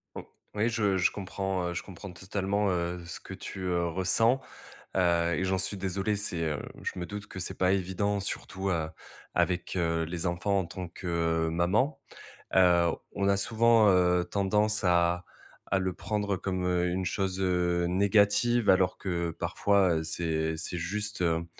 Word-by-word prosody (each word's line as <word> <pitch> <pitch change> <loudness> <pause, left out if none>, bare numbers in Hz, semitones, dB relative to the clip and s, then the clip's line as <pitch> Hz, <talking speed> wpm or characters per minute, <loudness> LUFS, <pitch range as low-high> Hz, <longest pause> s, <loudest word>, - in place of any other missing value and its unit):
O - - -6 0.3
oui, 110 +3 +2
je 105 -4 +1
je 90 - +3
comprends, 95 -2 -3
heu, - - -4
je 85 - -3
comprends 95 0 -9
totalement, 95 +3 -1
heu, 85 -1 -2
ce 85 - -7
que - - -10
tu, 95 - -7
heu, 85 -1 +1
ressens, 105 +9 +2 0.6
heu 85 -2 +2
et 95 - -1
j'en 95 0 +1
suis 95 +2 -3
désolé. 95 +2 -1
C'est 95 -5 -2
heu, 75 -3 -1 0.2
je 90 - -4
me 90 - -3
doute 105 0 -6
que 95 - -8
c'est 90 - -5
pas 90 0 +3
évident 100 +2 0
surtout, 95 0 -4
heu, 80 -4 -1 0.4
avec, 90 +1 0
heu, 85 -2 +1
les 85 +2 -3
enfants 95 +3 0
en 95 - -2
tant 90 +2 -6
que 85 -2 -1
maman. 100 - +1 0.6
Heu, 90 -2 +5 0.3
on 100 -1 0
a 100 - +3
souvent, 115 +1 +4
heu, 90 -1 +4
tendance 105 +2 +1
à 85 0 +2 0.5
à 95 - +3
le 95 -1 -1
prendre 105 0 -2
comme, 90 -1 -2
heu, 90 0 +1
une 90 +1 -1
chose, 95 0 -1
heu, 90 -1 +1
négative, 105 +5 +3
alors 95 -1 +4
que 85 -3 -2
parfois, 95 0 +2
heu, 80 - -2
c'est 80 0 -1
c'est 85 +2 -4
juste, 105 +4 -3
hem, 85 -1 +1
95 Hz, 175 wpm, -29 LUFS, 85-100 Hz, 0.6 s, Heu